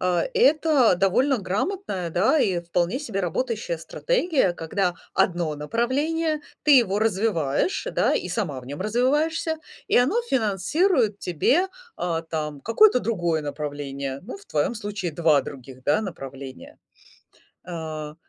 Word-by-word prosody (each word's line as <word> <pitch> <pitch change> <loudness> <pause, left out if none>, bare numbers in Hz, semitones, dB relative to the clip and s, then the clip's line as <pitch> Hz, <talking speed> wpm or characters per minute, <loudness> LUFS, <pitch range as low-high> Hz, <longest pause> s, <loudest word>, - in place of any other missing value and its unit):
а, 180 -1 +1
это 310 - +4
довольно 225 +9 +3
грамотная, 200 - -2
да 205 - +3
и 185 -8 +1
вполне 175 +6 -1
себе 225 -9 -3
работающая - - -2
стратегия, 360 - 0
когда 175 +2 -1 0.2
одно 170 -4 +1
направление 290 - -1 0.2
ты 290 -3 +7
его 205 -4 +1
развиваешь, 205 - 0
да - - +2
и - - -2
сама 150 - -2
в 125 - -14
нем 145 +5 -7
развиваешься, 295 - +1 0.3
и - - +3
оно 300 - +3
финансирует 225 - +1
тебе, 265 - +1 0.3
а, 165 -2 -2
там 150 -3 -4
какое-то 250 - +5
другое 175 -9 0
направление. 140 -2 -5
Ну, 250 - -8
в 405 - -18
твоем 150 +10 0
случае 205 -5 -4
2 155 -4 +3
других, 130 -1 -10
да, 150 - +3
направления. 135 -9 -8 0.9
А. 155 -3 -6
195 Hz, 130 wpm, -24 LUFS, -, 0.9 s, ты